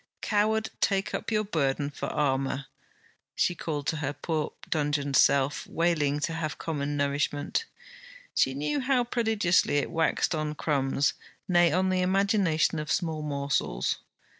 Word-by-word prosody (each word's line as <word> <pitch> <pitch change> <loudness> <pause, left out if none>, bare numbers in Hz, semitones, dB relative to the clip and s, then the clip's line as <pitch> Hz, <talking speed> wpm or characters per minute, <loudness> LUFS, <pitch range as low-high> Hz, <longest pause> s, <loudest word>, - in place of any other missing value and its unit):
Coward, 215 +1 +1
take 195 -1 +1
up - - -3
your 215 -1 +1
burden 145 -6 -1
for - - -5
armour! 135 -1 0 0.7
she - - +2
called 150 -4 -4
to 160 - 0
her 145 -1 -2
poor 155 +1 -2 0.2
dungeoned 145 -2 0
self 140 +1 +3
wailing 155 -4 +1
to 165 - -1
have 160 -1 -3
common 145 -2 -3
nourishment. 145 - 0 0.7
She 130 - +2
knew 150 - -1
how 260 -2 +2
prodigiously 220 -10 +2
it 145 - -1
waxed 165 +1 +1
on 155 -1 -2
crumbs; 140 -2 +1 0.3
nay, 175 -2 +4
on 185 +2 +2
the 185 0 +1
imagination 185 -5 +2
of 150 - -4
small 160 -3 -1
morsels. 140 - -1
155 Hz, 140 wpm, -28 LUFS, 145-185 Hz, 0.7 s, nay